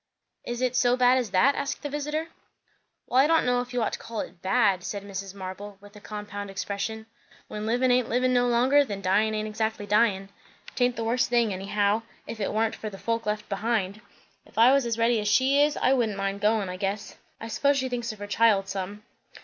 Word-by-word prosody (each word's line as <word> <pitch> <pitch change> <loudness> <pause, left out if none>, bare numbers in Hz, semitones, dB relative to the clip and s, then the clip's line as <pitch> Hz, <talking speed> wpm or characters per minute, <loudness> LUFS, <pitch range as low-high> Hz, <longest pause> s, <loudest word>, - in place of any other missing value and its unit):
"Is 240 +1 -3
it 255 -1 0
so 250 0 +3
bad 250 +1 +4
as 240 -4 -3
that?" 195 +10 +4
asked 280 +2 -4
the - - -2
visiter. 300 +3 -3 0.8
"Well, 255 - +2
I 275 - +6
don' 325 0 +3
know 245 0 +2
if 245 0 -8
you 245 -2 0
ought - - -2
to - - -4
call 230 -2 -5
it, 175 0 -10
'bad,'" 195 -3 +2
said 200 +1 -5
Mrs. 195 -1 -7
Marble 195 +1 -8
with 205 +1 -16
a - - -11
compound 205 -1 -7
expression. 200 +3 -4 0.4
"When 210 +1 -5
livin' 250 +3 +2
aint 250 -1 +2
livin' 255 +1 +1
no 245 0 +3
longer, 255 +4 +4
then 205 -7 -6
dyin' 210 +3 +2
aint 215 0 -2
exactly 220 -1 -2
dyin'. 205 -2 +2 0.4
'Taint 245 -1 +1
the 230 - -3
worst 240 +2 +1
thing, 235 -4 +2
anyhow; 205 +3 0 0.2
if 225 - -7
it 200 - -1
warnt 220 +1 0
for 215 - -6
the 195 - -10
folk 230 +1 -2
left 210 0 -2
behind. 210 -1 -2 0.4
If - - -22
I 235 +3 +7
was 275 -3 +2
as 230 -1 -1
ready 230 0 +2
as 210 - -2
she 265 +6 +4
is, 295 0 +2
I 260 - +3
wouldn't 225 -6 0
mind 195 0 -2
goin', 210 -1 +2
I 180 0 -5
guess. 200 +2 -4 0.2
I 225 - -7
s'pose 280 +5 +1
she 260 -1 0
thinks 240 -2 -3
of 215 - -10
her 205 - -6
child 205 -2 +2
some." 200 +2 -5
220 Hz, 225 wpm, -26 LUFS, 200-245 Hz, 0.8 s, I